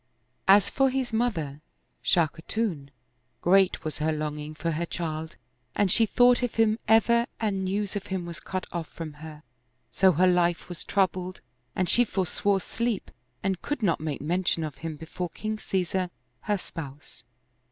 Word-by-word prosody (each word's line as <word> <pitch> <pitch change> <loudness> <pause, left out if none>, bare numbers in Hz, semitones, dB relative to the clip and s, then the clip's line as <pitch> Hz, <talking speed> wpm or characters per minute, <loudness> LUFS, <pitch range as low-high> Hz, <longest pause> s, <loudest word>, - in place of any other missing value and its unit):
As 200 +1 +7
for 270 0 +2
his 255 -2 -2
mother. 165 - -1 0.4
Shah 170 -3 +4
Khatun, 165 -3 -3 0.5
great 190 0 +4
was 155 -2 -4
her 155 +1 +1
longing 150 0 -4
for 165 +2 -2
her 165 +2 -2
child 160 -1 -4 0.4
and 200 -3 +2
she 225 +2 +4
thought 245 +3 +5
of 245 -2 -1
him 225 0 +3
ever 235 +2 +5
and 200 -4 0
news 200 +2 -1
of 205 0 -4
him 190 -3 -3
was 170 -1 -7
cut 185 -1 -4
oflf 170 -3 -3
from 160 -2 -7
her, 155 -1 -9 0.5
so 190 -2 +5
her 180 +4 +4
life 175 -1 +2
was 175 - -5
troubled 185 -2 0 0.3
and 185 - +1
she 245 - +5
forswore 195 -1 0
sleep 235 0 -2 0.3
and 190 -2 -1
could 290 -5 -3
not 170 -5 +2
make 150 -3 -3
mention 170 +2 +1
of 150 -4 -5
him 165 -1 -5
before 165 +3 -5
King 215 +4 -4
Caesar 185 -2 -1 0.3
her 210 -1 0
spouse. 145 -9 -9
185 Hz, 165 wpm, -27 LUFS, 160-210 Hz, 0.5 s, As